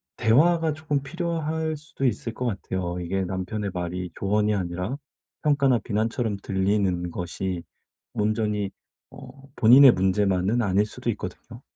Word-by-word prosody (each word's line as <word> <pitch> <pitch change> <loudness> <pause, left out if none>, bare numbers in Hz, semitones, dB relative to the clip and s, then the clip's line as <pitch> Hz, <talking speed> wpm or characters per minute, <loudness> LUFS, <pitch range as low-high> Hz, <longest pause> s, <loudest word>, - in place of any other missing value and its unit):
대화가 160 +7 +3
쪼금 150 -2 -2
필요할 160 0 -2
수도 150 -2 -5
있을 115 -2 -1
것 125 - -4
같아요. 95 -5 -3
이게 95 +2 -1
남편의 95 +2 -3
말이 90 0 -4
조언이 105 +2 +1
아니라 90 +5 -3 0.5
평가나 140 -4 +3
비난처럼 110 0 -1
들리는 95 -2 0
것이 90 +1 -4 0.5
온전히 105 -1 0 0.4
어 - - -12 0.3
본인의 130 +3 +8
문제만은 95 +2 +1
아닐 100 -1 +2
수도 120 +3 -5
있거든요. 110 +4 -8
105 Hz, 305 characters per minute, -25 LUFS, 95-130 Hz, 0.5 s, 본인의